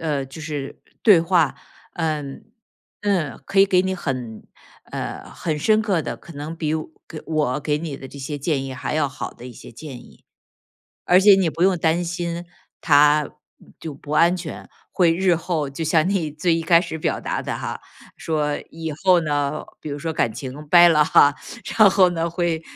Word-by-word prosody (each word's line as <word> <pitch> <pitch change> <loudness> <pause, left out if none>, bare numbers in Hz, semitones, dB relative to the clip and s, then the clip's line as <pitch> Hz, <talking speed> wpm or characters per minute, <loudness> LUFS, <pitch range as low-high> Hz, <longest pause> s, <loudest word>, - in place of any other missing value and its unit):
呃， 150 -4 -1
就 135 +5 -11
是 150 -3 -6 0.2
对 200 -7 +7
话， 165 -3 +2 0.4
嗯。 150 -4 -3 0.6
嗯， 180 -10 -1
可 195 0 +3
以 - - +8
给 185 -2 +3
你 190 0 -1
很， 125 -9 -5 0.5
呃， - - -6
很 155 -3 -3
深 215 +8 +3
刻 195 -7 0
的， 120 -3 -5
可 170 - -14
能 150 +3 -6
比， 155 -2 -2 0.3
给 155 - -9
我 150 -4 0
给 150 +1 -1
你 150 -3 -5
的 135 - -10
这 140 - -11
些 140 +2 -5
建 145 -1 -1
议 135 -1 -6
还 130 - -4
要 150 -3 +1
好 130 - -6
的 125 - -12
一 125 - -9
些 - - -12
建 135 +2 -9
议。 - - -20 0.8
而 180 +2 +5
且 200 -1 +8
你 185 -4 +1
不 165 +3 -2
用 190 -1 +3
担 165 +1 +1
心 170 0 -4 0.4
它 150 -1 +4 0.5
就 155 -3 -6
不 145 +1 -11
安 170 +3 +4
全， 170 -3 -8 0.2
会 170 -3 +3
日 180 -1 +2
后 160 -5 -2
就 160 +4 -5
像 160 +2 +2
你 175 -6 0
最 165 +3 0
一 165 - 0
开 170 +1 +4
始 160 - -5
表 - - -2
达 - - -3
的 - - -4
哈， - - -5 0.4
说 150 -2 -1
以 160 -1 -5
后 180 -2 +5
呢， 145 -1 -1 0.2
比 - - -7
如 145 - -4
说 160 +2 -3
感 115 -7 0
情 140 +3 -8
掰 175 +2 +7
了 150 -2 +4
哈， 145 -2 +5 0.4
然 215 -3 +8
后 185 -2 +4
呢， 170 -1 -2
会 170 -2 -1
160 Hz, 210 characters per minute, -22 LUFS, 145-175 Hz, 0.8 s, 以